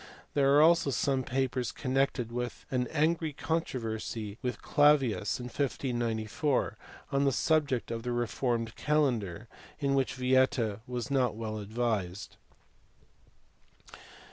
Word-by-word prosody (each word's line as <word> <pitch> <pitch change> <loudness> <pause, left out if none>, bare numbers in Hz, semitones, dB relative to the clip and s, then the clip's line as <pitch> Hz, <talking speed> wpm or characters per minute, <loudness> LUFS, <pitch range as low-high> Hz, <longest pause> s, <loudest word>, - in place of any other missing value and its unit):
There 140 -1 +4
are 150 - +7
also 165 -2 +5
some 135 0 +1
papers 130 -1 -1
connected 130 -3 0
with 120 0 -4
an 125 -1 0
angry 160 0 +1
controversy 115 -9 -3
with 125 -3 -3
Clavius, 140 -9 +3
in 125 - -6
1594, 125 0 -1 0.4
on 140 0 +2
the 140 - +4
subject 140 -4 +1
of 115 0 -3
the 125 +1 -3
reformed 120 -1 -1
calendar, 120 - 0 0.3
in 140 -2 0
which 135 -1 +1
Vieta 130 -4 +2
was 125 +2 -4
not 130 -5 +2
well 110 -1 -4
advised. 105 -3 -2
125 Hz, 115 wpm, -30 LUFS, 115-140 Hz, 0.4 s, are